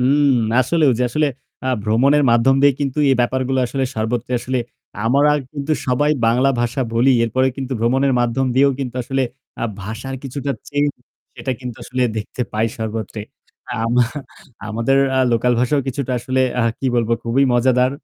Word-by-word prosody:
হুম, 140 +3 +3 0.3
আসলেও 150 +4 +2
ওই 115 - -1
যে - - +3
আসলে 150 +5 +1 0.4
আ - - 0
ভ্রমণের 130 +8 +3
মাধ্যম 120 +3 +4
দিয়ে 140 0 +6
কিন্তু 140 0 -2
এই - - +4
ব্যাপারগুলো 130 +2 0
আসলে 135 +2 -2
সর্বত্র 110 +2 -2
আসলে 130 +2 -2 0.5
আমরা 140 +6 +4 0.2
কিন্তু 145 +1 -2
সবাই 130 +4 +2 0.2
বাংলা 125 +4 +3
ভাষা 120 +3 -1
বলি। 120 +4 +4
এরপরে 130 +3 +1
কিন্তু 135 -1 -4
ভ্রমণের 130 +4 +2
মাধ্যম 120 +2 0
দিয়েও 140 +2 +5
কিন্তু 130 -3 -4
আসলে 135 +2 -1 0.4
আ - - +2 0.2
ভাষার 110 +6 -6
কিছুটা 140 +1 -4 0.2
চেঞ্জ 145 0 +1 0.5
সেটা 125 +1 -3
কিন্তু 125 -3 -6
আসলে 130 0 -2
দেখতে 110 +4 -4
পাই 110 +1 +1
সর্বত্র। 110 -1 -4 0.7
আমা 120 +2 +3 0.7
আমাদের 115 +5 +1 0.2
আ - - +3
লোকাল 120 +2 +2
ভাষাও 135 +4 +2
কিছুটা 130 0 -3
আসলে 130 +2 -1 0.2
আ - - +2 0.2
কি 135 - -2
বলবো 115 -1 +1
খুবই 120 +4 +2
মজাদার 125 +1 +3
130 Hz, 165 wpm, -19 LUFS, 115-135 Hz, 0.7 s, দিয়ে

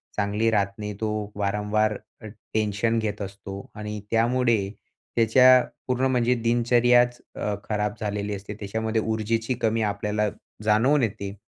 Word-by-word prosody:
चांगली 105 +2 +1
राहत 100 -2 +2
नाही. 105 0 -4
तो 105 -1 -2
वारंवार 105 +1 0 0.2
अ, - - -10 0.3
टेन्शन 110 +1 +1
घेत 105 -2 -3
असतो 100 0 -7
आणि 105 0 -5
त्यामुळे 120 +1 +3 0.6
त्याच्या 125 +2 +6 0.2
पूर्ण 130 0 +1
म्हणजे 125 0 +2
दिनचर्याच 120 +1 +3 0.2
अ, 105 - -2
खराब 105 -1 -1
झालेली 105 -1 -2
असते. 100 +1 -7
त्याच्यामध्ये 110 +2 -2
ऊर्जेची 110 +2 -1
कमी 115 0 +1
आपल्याला 105 +1 -1 0.3
जाणवून 125 +7 +3
येते 100 -3 -3
110 Hz, 130 wpm, -25 LUFS, 105-115 Hz, 0.6 s, त्याच्या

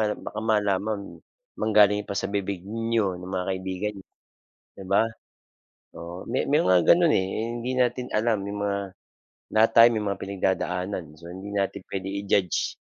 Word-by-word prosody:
baka 110 - -7
malaman, 105 -2 -1 0.4
manggaling 105 -1 +4
pa - - -3
sa 100 - -1
bibig 100 -2 -2
niyo 110 -2 -1
ng 90 +1 -9
mga 95 -1 -2
kaibigan 95 +2 -3
nya, 95 - -15 0.7
'di 95 - -10
ba? 100 - +5 1.0
Oo, 85 +2 -7
may 130 - 0
may 145 - +3
mga 90 -1 +5
gano'n, 170 -3 +6
eh, 95 - +2 0.3
hindi 120 +2 -3
natin 125 0 +1
alam 110 -1 +1
yung 100 0 -4
mga, 100 -1 0 0.8
lahat 110 +1 +6
tayo 115 +1 +10
may 105 - -1
mga 100 -1 -2
pinagdadaanan 95 -1 -2
so 85 +2 -12
hindi 95 +3 -8
natin 100 0 -1
puwede 95 0 -4
i-judge, 100 -3 0
100 Hz, 160 wpm, -25 LUFS, 95-110 Hz, 1.0 s, tayo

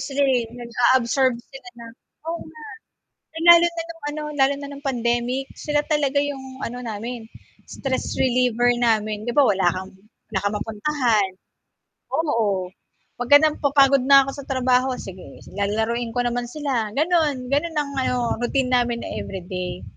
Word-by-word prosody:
sila, 275 +1 0
eh, 250 -4 +1
nag-a-absorb 245 +2 +2
sila 260 +1 -13
ng 230 -1 -10 0.4
oo, 335 0 -3 0.7
na 320 - -14
no'ng, 330 - -2
lalo 340 - +4
na 340 - -17
no'ng 330 -1 -11
ano, 305 +1 -5
lalo 275 0 +3
na 285 - -7
no'ng 285 +1 -10
pandemic, 240 +1 -1
sila 295 -1 0
talaga 290 -3 +1
yung 265 -2 -5
ano 245 +1 -5
namin, 230 +2 -5 0.4
stress 265 -2 -3
reliever 245 -1 +2
namin. 215 -3 0
'Di 240 - -2
ba, 285 +2 +5
wala 190 -4 +3
kang 185 +2 -7 0.4
wala 205 - 0
kang 200 +1 -1
mapuntahan, 225 -2 0 0.8
oo, 210 - 0 0.5
pagka 245 +4 +6
nam 310 -1 +2
napapagod 275 -1 +4
na 275 0 +8
ako 275 - -4
sa - - -10
trabaho, 255 -1 +2
sige, 185 -1 -10 0.2
lalaruin 225 +3 -1
ko 245 - +2
naman 240 0 -1
sila, 255 -6 -2
gano'n, 305 -5 +1
gano'n 315 +3 0
ang 290 -1 -1
ano, 250 -3 -1
routine 250 +1 0
namin 240 -1 +1
na - - -5
everyday. 180 - -5
250 Hz, 155 wpm, -22 LUFS, 230-280 Hz, 0.8 s, na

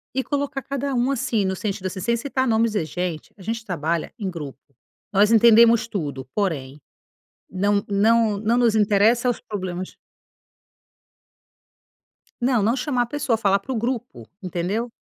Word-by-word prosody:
e 265 - 0
colocar 280 -1 -2
cada 275 0 -3
um 245 +2 +1
assim, 235 -6 0
no 190 0 -1
sentido 200 -1 -4
assim, 185 0 -6
sem 235 +3 +1
citar 260 +1 -1
nomes: 225 -1 +2
“Gente, 175 +1 -3
a - - -15
gente 225 +3 -4
trabalha 165 -2 -2
em 195 -2 -2
grupo, 150 -6 -7 0.5
nós 205 +3 +4
entendemos 230 0 +6
tudo, 145 - -5
porém, 150 -8 -2 0.7
não 200 +2 +1
não 215 +1 +3
não 220 +3 +1
nos 235 -3 +3
interessa 215 +4 +3
os - - -4
problemas”. 185 -5 -5 2.5
Não, 245 -3 +2
não 230 +4 +2
chamar 255 -4 0
a - - -4
pessoa, 255 -3 -1
falar 200 -2 +2
para 255 +7 -8
o - - -1
grupo, 230 - -4
entendeu. 190 +6 -3
215 Hz, 150 wpm, -23 LUFS, 185-240 Hz, 2.5 s, entendemos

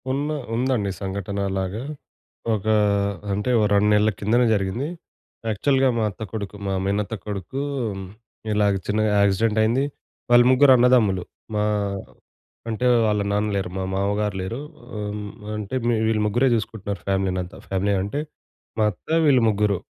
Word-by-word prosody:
ఉన్న 140 +3 -1 0.3
ఉందండి 120 -5 0
సంఘటన 100 +1 -3
అలాగా. 95 +3 -2 0.7
ఒక 105 -2 -3 0.7
అంటే 105 +5 -1
ఓ - - +3
2 100 +1 +4
నెలల 105 +1 +4
కిందనే 120 +4 +3
జరిగింది. 105 +7 -1 0.6
యాక్చువల్‌గా 135 +5 +2
మా 115 - +1
అత్త 105 - -8
కొడుకు 105 -2 -5
మా 95 - 0
మేనత్త 100 +2 -1
కొడుకు 105 +6 -4 0.9
ఇలాగా 105 -1 +2
చిన్నగా 110 +1 +1
యాక్సిడెంట్ 105 +2 +2
అయింది. 120 +5 +2 0.5
వాళ్ళు 120 0 +7
ముగ్గురన్నదమ్ములు 125 -7 +5 0.3
మా 105 - +1 1.1
అంటే 115 +3 0 0.2
వాళ్ళ 105 -1 +1
నాన్న 105 +1 +1
లేరు 95 -2 -1
మా 95 - -2
మామగారు 100 +1 0
లేరు. 110 +7 -4 0.4
ఆహ్, 105 -1 -3
హ్మ్. 105 0 -5 0.2
మి 105 - -7
అంటే 105 +4 -4 0.3
వీళ్ళు 110 -1 +1
ముగ్గురే 120 +6 +2
జూసుకుంటున్నారు 105 -2 -4
ఫ్యామిలీనంతా. 95 -1 -1
ఫ్యామిలీ 95 +1 +1
అంటే 100 +9 -3 0.6
మా 110 - +4
అత్త, 90 - -21 0.2
వీళ్ళు 135 -4 +5
ముగ్గురు 105 -2 +1
105 Hz, 140 wpm, -23 LUFS, 100-115 Hz, 1.1 s, వాళ్ళు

